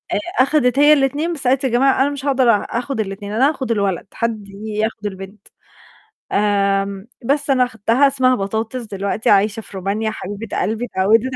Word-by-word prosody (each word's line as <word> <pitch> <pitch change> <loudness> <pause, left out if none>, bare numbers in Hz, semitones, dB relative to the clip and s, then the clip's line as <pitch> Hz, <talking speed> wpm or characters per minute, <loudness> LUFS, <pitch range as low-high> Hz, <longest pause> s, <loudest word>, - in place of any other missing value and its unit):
آآ، 230 +4 +1
أخدت 275 -2 +2
هي 295 +1 +7
ال2، 290 +4 +1
بس 275 -5 -3
قالت: 265 +2 +2
"يا 260 - +1
جماعة 265 +3 +3
أنا 280 - +3
مش 285 -1 -6
هاقدر 260 -3 +3
آخد 235 +4 0
ال2، 200 0 -4
أنا 265 +6 +3
هاخد 260 -6 -3
الولد، 200 -4 -1
حد 220 -3 -3
ياخد 215 +1 -4
البنت." 195 +1 -8 0.8
آمم، 200 0 0 0.2
بس 285 +2 0
أنا 255 -2 +3
خدتها 230 +5 +2
اسمها 260 -2 +2
بطاطس 220 +5 -3
دلوقتي 200 0 -2
عايشة 210 +2 +3
في 195 - -11
رومانيا 210 +4 -2
حبيبة 205 +1 -5
قلبي 220 +4 -1
اتعودِت 225 +5 +1
225 Hz, 170 wpm, -19 LUFS, 200-260 Hz, 0.8 s, هي